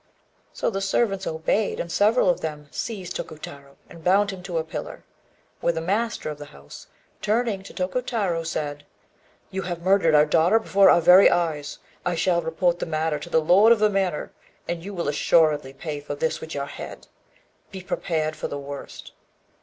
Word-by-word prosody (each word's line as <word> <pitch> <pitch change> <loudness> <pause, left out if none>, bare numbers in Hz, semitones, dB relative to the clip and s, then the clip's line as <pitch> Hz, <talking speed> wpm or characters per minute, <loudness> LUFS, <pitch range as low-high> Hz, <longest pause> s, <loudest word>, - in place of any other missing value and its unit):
So - - -2
the 195 -1 -3
servants 195 0 0
obeyed, 160 +6 -1
and 170 - -4
several 215 +4 +3
of 180 - +2
them 150 -2 -6
seized 190 -6 -5
Tokutarô 140 -3 -8
and 165 - -14
bound 200 +3 +3
him 190 -2 -8
to 180 -2 -4
a 160 - 0
pillar. 160 - -7 0.6
Then 170 - +1
the - - -1
master 200 0 -1
of 150 - -9
the 145 - -7
house, 70 - -13 0.3
turning 215 -2 0
to 195 - -12
Tokutarô, 190 -3 -2
said 150 -3 -4 0.7
"You 190 - -3
have 175 -2 -5
murdered 185 -4 +4
our 150 0 +6
daughter 165 +7 +4
before 200 -3 +4
our 170 - +5
very 180 +4 +8
eyes. 155 -4 -1 0.3
I 180 -1 -1
shall 170 0 +1
report 170 +2 0
the - - -3
matter 155 -1 -1
to 170 - -9
the 160 - +3
lord 195 +8 +5
of 235 - +6
the 215 0 +3
manor, 190 -6 -1 0.4
and 170 -1 -3
you 200 - -6
will 170 -3 -2
assuredly 150 -1 +2
pay 150 +2 -6
for 145 0 -6
this 160 +2 -2
with 160 - -7
your 140 0 -2
head. - - -9 0.6
Be 190 -1 -9
prepared 160 -4 -2
for - - -4
the 145 - -5
worst." 140 0 -8
170 Hz, 185 wpm, -24 LUFS, 155-195 Hz, 0.7 s, very